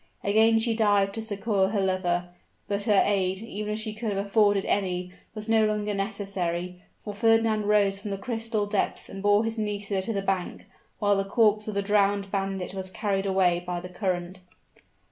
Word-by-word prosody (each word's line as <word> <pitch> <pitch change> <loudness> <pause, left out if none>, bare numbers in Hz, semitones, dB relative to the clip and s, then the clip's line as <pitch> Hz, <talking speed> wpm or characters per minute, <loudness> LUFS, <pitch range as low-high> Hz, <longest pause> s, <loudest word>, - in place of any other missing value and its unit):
Again 220 +2 +4
she 225 +1 +1
dived 205 -3 +2
to 225 - -4
succor 205 -2 0
her 205 +1 -1
lover, 180 -2 0 0.4
but 200 0 -1
her 205 -2 +5
aid, 190 0 0
even 210 -1 -4
if - - -3
she 215 0 -4
could 215 +1 -4
have 200 0 -2
afforded 205 -1 +3
any, 180 -2 -1 0.2
was 215 0 -6
no 225 -1 +4
longer 210 -1 0
necessary, 185 -3 -3 0.2
for 210 - -7
Fernand 225 0 +2
rose 200 -2 +3
from 205 - -6
the 195 - -3
crystal 225 -1 -2
depths 205 -1 -2
and 195 - -7
bore 205 +1 +4
his 225 0 -2
Nisida 205 -2 -2
to 190 - -3
the 195 -1 -2
bank, 190 -2 -2 0.3
while 205 -1 +2
the 195 - +1
corpse 215 +1 +2
of 215 - -4
the 200 - 0
drowned 200 -1 +1
bandit 195 -2 -2
was 190 -1 -4
carried 195 0 -1
away 185 -2 +2
by 180 0 -3
the 180 +1 -8
current. 180 -1 -3
200 Hz, 190 wpm, -26 LUFS, 190-215 Hz, 0.4 s, her